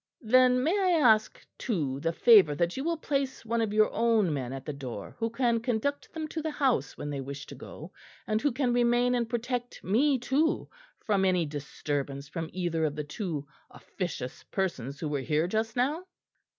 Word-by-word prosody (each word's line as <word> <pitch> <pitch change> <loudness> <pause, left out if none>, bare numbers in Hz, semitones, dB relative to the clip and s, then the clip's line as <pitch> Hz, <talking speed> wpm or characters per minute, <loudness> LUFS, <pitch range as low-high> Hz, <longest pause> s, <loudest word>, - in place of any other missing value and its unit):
"Then 250 +2 +5
may 315 - +2
I 375 -3 +3
ask 220 -6 +3
too 150 - -1
the 165 +3 0
favour 190 -6 +6
that 170 +3 0
you 270 - -3
will 335 +1 0
place 275 -5 -2
one 230 +1 0
of 220 -2 0
your 215 0 +3
own 225 -7 +2
men 130 -3 -3
at 135 0 -7
the 150 - -4
door 125 -7 -7
who 225 0 0
can 235 0 +1
conduct 245 +4 -2
them 315 -1 -4
to 320 - -4
the 315 - -2
house 260 - 0
when 145 - -5
they 140 -1 -3
wish 140 +1 -7
to - - -10
go, 155 - -10 0.3
and 215 0 0
who 290 - +2
can 250 0 0
remain 245 +1 +3
and 235 -2 0
protect 245 +1 -3
me 265 +8 +3
too 275 +6 +1 0.4
from 200 -3 +2
any 180 -3 +2
disturbance 145 -1 -4
from 160 +2 -5
either 170 -3 -1
of 150 -2 0
the 150 - -3
two 150 -1 -4 0.2
officious 165 -9 -6
persons 140 - -2
who 160 - -3
were 145 -2 -1
here 150 +4 +1
just 220 +4 -1
now?" 290 +8 0
215 Hz, 195 wpm, -29 LUFS, 150-250 Hz, 0.4 s, favour